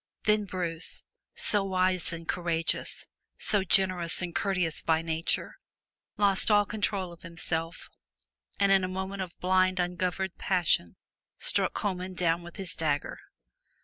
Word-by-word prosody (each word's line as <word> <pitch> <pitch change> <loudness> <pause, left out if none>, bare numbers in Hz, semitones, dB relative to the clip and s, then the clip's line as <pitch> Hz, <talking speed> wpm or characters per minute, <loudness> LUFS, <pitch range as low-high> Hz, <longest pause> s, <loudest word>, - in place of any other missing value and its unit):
Then 210 0 +3
Bruce, 175 -3 -4 0.3
so 205 -2 0
wise 185 -2 +1
and 165 0 -7
courageous, 170 -2 0 0.3
so 205 -2 +2
generous 185 -3 +2
and 175 -1 -4
courteous 185 -5 +1
by 160 0 +2
nature, 165 0 -1 0.6
lost 200 -1 +3
all 205 -1 +5
control 200 -3 -2
of 170 - -16
himself, 165 0 -4 0.7
and 200 0 +4
in 195 -1 +5
a - - 0
moment 190 +1 -4
of 180 -2 -6
blind 185 0 +3
ungoverned 180 +1 -1
passion, 175 - +2 0.4
struck - - +2
Comyn 185 -2 -2
down 170 -1 +1
with 175 0 -11
his 190 -3 -3
dagger. 145 -3 -1
185 Hz, 135 wpm, -29 LUFS, 170-190 Hz, 0.7 s, all